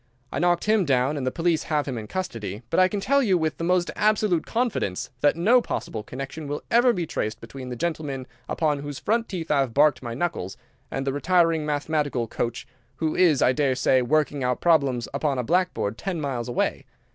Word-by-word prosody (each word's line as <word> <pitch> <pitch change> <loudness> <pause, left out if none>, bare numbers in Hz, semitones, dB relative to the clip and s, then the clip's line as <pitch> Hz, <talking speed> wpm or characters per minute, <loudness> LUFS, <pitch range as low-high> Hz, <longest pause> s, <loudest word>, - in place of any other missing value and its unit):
I - - -2
knocked 175 -1 +2
him 215 -1 +3
down, 135 -1 +1
and 135 -3 -3
the - - +1
police 165 0 +1
have 150 -2 0
him 135 - -3
in 110 -2 -6
custody; 115 - -5
but 165 - +2
I 185 - +6
can 205 +2 -3
tell 280 +7 +2
you 195 -8 +3
with 155 -4 -1
the - - -3
most 180 0 +1
absolute 210 -5 +2
confidence 225 - -1
that 145 - +3
no 220 +9 +4
possible 110 - -4
connection 135 +7 -7
will 145 +1 -4
ever 240 +2 +5
be 180 -7 -2
traced 110 -6 -3
between 125 +3 -9
the 125 - -4
gentleman 145 -3 -3 0.2
upon 150 -3 0
whose 145 -1 -6
front 230 +1 0
teeth 170 -5 -4
I 145 - +3
have 130 -4 -1
barked 145 -2 +4
my 120 -2 -5
knuckles 125 - -3 0.3
and 135 - -3
the 135 - 0
retiring 165 0 +2
mathematical 145 -4 -1
coach, 115 +1 -3 0.3
who 155 +3 -1
is, 165 -7 +4
I - - +5
daresay, 130 -1 +2
working 145 +1 +1
out 125 0 0
problems 140 -8 +2
upon 140 -1 0
a 125 - 0
blackboard 170 - 0
ten 185 -4 -3
miles 130 -5 -3
away. 120 - -1
150 Hz, 205 wpm, -25 LUFS, 130-175 Hz, 0.3 s, I